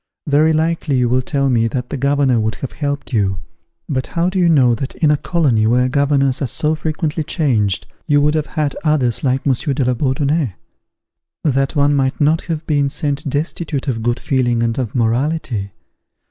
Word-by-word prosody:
"Very 150 +2 +3
likely 160 -3 0
you 125 -1 +2
will 125 +2 +2
tell 140 +1 -1
me 115 -3 +2
that 125 +2 -4
the - - -2
governor 140 -2 +2
would 110 0 -1
have 135 - -6
helped 145 -2 -4
you; 95 -4 +1 0.5
but 130 -4 -2
how 170 +2 0
do 190 - -1
you 175 -1 +4
know 130 -7 +4
that 130 +4 -4
in 155 -2 +2
a - - +4
colony 140 -9 +1
where 125 +2 +3
governors 140 -1 +1
are 135 - 0
so 150 +6 0
frequently 155 0 -2
changed, 120 - 0 0.2
you 145 -1 +4
would 150 +1 +2
have 155 -1 -1
had 150 -2 -2
others 140 -7 +1
like 130 0 0
Monsieur 135 +1 0
de 135 -2 0
la 125 - +2
Bourdonnais? 135 - 0 0.9
that 135 -2 0
one 145 0 +3
might 135 -1 0
not 155 +2 +3
have 160 -2 -4
been 145 -2 +1
sent 145 0 -2
destitute 145 0 -3
of 115 -4 -1
good 120 +2 0
feeling 120 -3 0
and 115 +2 -1
of 120 -5 -3
morality? 120 -3 -1
140 Hz, 190 wpm, -18 LUFS, 125-150 Hz, 0.9 s, you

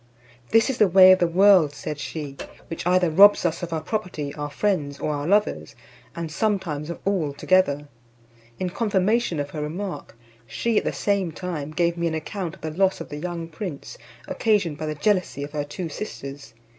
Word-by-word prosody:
"This 225 +4 +4
is 255 - -7
the 210 - +6
way 185 +1 +8
of 185 - +5
the 175 - +3
world," 180 -4 +5
said 150 0 -5
she, 145 0 -6 0.3
"which 165 +1 -4
either 180 -2 +3
robs 200 +3 +7
us 170 +1 0
of 175 -1 -5
our 160 -1 -2
property, 155 -6 -4
our 145 -1 -5
friends, 145 -4 -1
or 150 - -2
our 145 +1 -3
lovers; 195 - +1 0.4
and 165 -2 -5
some. 210 +5 +1
times 150 -5 -5
of 170 - -5
all 180 -8 0
together." 145 -2 +2 0.7
In 185 -1 -2
confirmation 205 -2 +1
of 145 0 -4
her 150 - -5
remark, 170 - -5 0.3
she 220 - 0
at - - -9
the - - 0
same 200 -4 0
time 160 -4 -5
gave 170 +2 0
me 170 0 0
an 160 - -2
account 175 +2 -5
of - - -22
the 155 - -4
loss 190 +4 +1
of - - -8
the 150 - -6
young 170 +1 -5
prince, 170 - -7 0.3
occasioned 200 -9 0
by 155 - -3
the 155 - -3
jealousy 180 -3 0
of 145 - -7
her 150 -1 -2
two 165 +4 -5
sisters. 140 - -8
170 Hz, 200 wpm, -24 LUFS, 150-190 Hz, 0.7 s, way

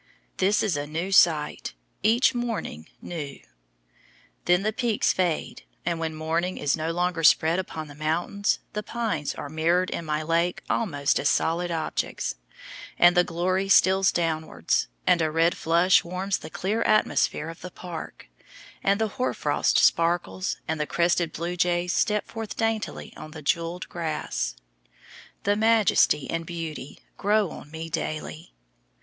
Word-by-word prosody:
This 200 +3 +2
is 200 -7 +1
a 145 0 -3
new 165 +5 -3
sight, 155 - +3 0.3
each 235 +5 +4
morning 230 - -4
new. 150 -5 -6 1.1
Then 180 +2 +3
the 215 +1 0
peaks 235 -2 +1
fade, 175 -4 -1 0.2
and 170 -1 -1
when 160 -1 -3
morning 165 +4 -1
is 145 - +1
no 160 +1 -3
longer 175 -1 -1
"spread 165 +2 +5
upon 160 -4 -5
the 145 - -11
mountains," 165 +7 0 0.2
the 210 - -2
pines 210 -10 -3
are - - -6
mirrored 170 +5 +1
in - - -3
my 155 -1 -2
lake 170 +2 0
almost 145 -10 0
as 145 - +2
solid 175 +2 +1
objects, 165 - -2 0.6
and 175 +1 +6
the 180 - +5
glory 185 +3 -1
steals 190 0 +5
downwards, 160 -2 0 0.2
and 180 -2 +4
a 160 - +2
red 165 +2 +2
flush 170 +3 +4
warms 185 +3 -2
the - - -9
clear 205 +7 -2
atmosphere 215 -7 +2
of 165 - -10
the 180 - -7
park, 175 - -8 0.6
and 200 +1 +2
the 220 - +1
hoar 255 - 0
frost - - +1
sparkles 175 +3 +2
and 160 -1 -2
the 150 - -1
crested 170 -1 +1
blue 170 +3 -4
jays 175 0 +1
step 210 -1 +1
forth 225 -2 -7
daintily 225 -1 -2
on 155 - -9
the 155 0 -10
jewelled 170 +4 -1
grass. 155 - -3 0.9
The 205 +1 +2
majesty 215 -9 +3
and 165 0 -2
beauty 165 -4 -7 0.2
grow 205 -3 +2
on - - -10
me 160 +1 -6
daily. 155 +1 -5
170 Hz, 155 wpm, -26 LUFS, 160-190 Hz, 1.1 s, and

